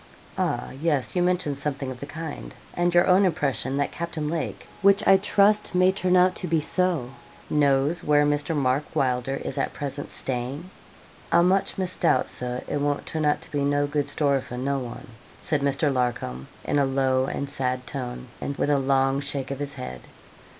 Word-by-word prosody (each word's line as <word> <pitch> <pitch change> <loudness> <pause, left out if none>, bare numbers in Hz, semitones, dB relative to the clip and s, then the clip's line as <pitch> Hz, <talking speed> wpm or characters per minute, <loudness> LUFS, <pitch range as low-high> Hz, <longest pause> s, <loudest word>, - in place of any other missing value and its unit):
'Ah, - - -1
yes, 150 -4 0
you 180 - +2
mentioned 175 -6 0
something 140 -2 -2
of 125 - -8
the 140 - -7
kind; 150 - -7 0.2
and 175 0 +1
your 175 - +6
own 190 +1 +5
impression, 140 -6 0
that 145 - 0
Captain 170 -3 -4
Lake, 165 +1 -3
which 200 +2 +4
I 195 - +8
trust 205 0 +2
may 185 +1 +5
turn 185 -1 +1
out 180 +1 +5
to 180 - -2
be 165 -1 +2
so, 165 -5 +1 0.4
knows 145 +2 +2
where 145 0 +4
Mr. 145 +2 0
Mark 135 0 +1
Wylder 125 0 0
is - - -4
at - - -1
present 145 0 -5
staying.' 135 +8 -3 0.6
'I - - +6
much 185 +2 +2
misdoubt, 185 -8 +1
Sir, 125 0 -4
it 145 - -2
won't 145 0 -1
turn 155 -1 -2
out 150 - +2
to - - -10
be 145 -1 0
no 145 0 +2
good 145 -1 -1
story 140 -2 +1
for 125 - -8
no 135 +2 -1
one,' 120 -2 -8 0.3
said 150 -5 -1
Mr. 140 +1 +1
Larcom, 120 - -2 0.2
in 145 - +1
a 140 - +3
low 130 -1 +1
and 140 +1 -3
sad 130 -2 -2
tone, 125 -2 -5
and 140 - -4
with 145 - +1
a 140 - +3
long 135 0 +2
shake 140 -1 -4
of 140 - -4
his 145 -1 -4
head. 65 - -7
145 Hz, 190 wpm, -25 LUFS, 135-165 Hz, 0.6 s, I